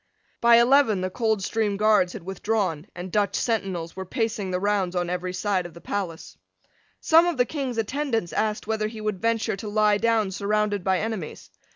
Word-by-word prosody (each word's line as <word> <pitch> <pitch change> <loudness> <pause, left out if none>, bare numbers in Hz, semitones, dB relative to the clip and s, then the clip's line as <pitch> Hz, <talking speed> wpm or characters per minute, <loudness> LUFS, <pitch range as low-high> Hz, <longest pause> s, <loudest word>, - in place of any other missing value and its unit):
By 235 0 +7
eleven 235 -4 +4
the 185 0 -2
Coldstream 220 -1 0
Guards 210 -4 +3
had 215 - -8
withdrawn; 190 -4 -2
and 180 +1 -7
Dutch 205 0 +1
sentinels 190 -8 -2
were 190 - -5
pacing 215 0 -2
the 180 0 -1
rounds 195 -2 0
on 175 -1 -1
every 180 0 -3
side 185 -1 -1
of 170 - -17
the - - -10
palace. 180 -4 -5 0.6
Some 330 +2 +5
of 345 -5 -1
the 245 - +3
King's 265 -4 -4
attendants 225 - -1
asked 215 0 -1
whether 215 0 -1
he 220 0 -8
would 215 -3 -3
venture 230 -1 0
to 210 +2 -6
lie 210 0 +3
down 225 -3 +1
surrounded 205 0 0
by 190 0 +2
enemies. 215 -6 -5
210 Hz, 185 wpm, -25 LUFS, 185-225 Hz, 0.6 s, By